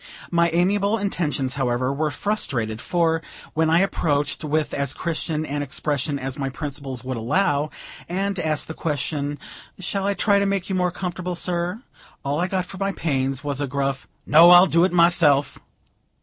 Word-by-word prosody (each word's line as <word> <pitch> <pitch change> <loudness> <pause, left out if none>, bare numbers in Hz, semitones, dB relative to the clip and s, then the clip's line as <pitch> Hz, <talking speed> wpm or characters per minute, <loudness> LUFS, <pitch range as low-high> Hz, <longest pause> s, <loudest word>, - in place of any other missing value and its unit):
My 170 0 +3
amiable 200 +5 +2
intentions, 155 - -1
however, 130 -1 0
were 155 +2 0
frustrated; 130 - -1
for, 165 -2 +1 0.3
when 160 0 +2
I 165 +2 +4
approached, 145 -7 0
with 150 0 -1
as 140 -2 -1
Christian 155 -1 -2
an 145 -1 -3
expression 145 +1 -2
as 135 0 -5
my 135 -1 -1
principles 135 -3 -6
would 130 -1 -4
allow, 145 - +1 0.4
and 195 +2 -1
asked 155 -3 -1
the 160 - -5
question 145 -1 -2 0.4
"Shall 195 +1 -3
I 200 - +1
try 200 0 +3
to 200 - +1
make 195 -1 -1
you 190 - -1
more 180 -1 +1
comfortable, 180 0 -4
sir?" 175 +6 -2 0.4
all 140 +2 0
I 180 - +1
got 185 -1 -1
for 190 - -10
my 195 0 -1
pains 135 -4 -1
was 145 -1 -2
a 145 - -1
gruff 135 0 -2 0.2
"No; 165 +4 +7
I'll 180 +1 +9
do 170 -2 +3
it 190 - 0
myself." 170 -5 +4
160 Hz, 175 wpm, -23 LUFS, 140-180 Hz, 0.4 s, I'll